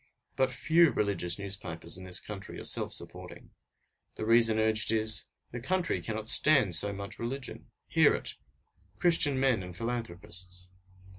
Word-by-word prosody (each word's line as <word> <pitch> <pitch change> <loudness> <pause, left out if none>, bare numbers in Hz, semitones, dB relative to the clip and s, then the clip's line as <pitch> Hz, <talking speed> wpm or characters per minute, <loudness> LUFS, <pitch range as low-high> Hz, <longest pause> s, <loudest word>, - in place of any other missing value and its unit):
But 130 -1 +1
few 160 +6 +2
religious 95 -7 -2
newspapers 95 -4 -6
in 95 +1 -10
this 90 -1 0
country 100 -2 -9
are - - -9
self - - +2
supporting. - - -8 0.6
The - - -5
reason 115 -1 +4
urged 110 0 +3
is 110 -1 +5 0.2
the 120 - -6
country 180 +6 -2
cannot 110 -1 -6
stand 130 - +4
so 100 +5 +1
much 100 +2 -7
religion! 130 +3 -6 0.2
Hear - - +3
it! - - -6 0.6
Christian 160 -6 +4
men 130 -6 +1
and 90 -1 -10
philanthropists! 90 -5 -6
110 Hz, 145 wpm, -29 LUFS, 95-130 Hz, 0.6 s, is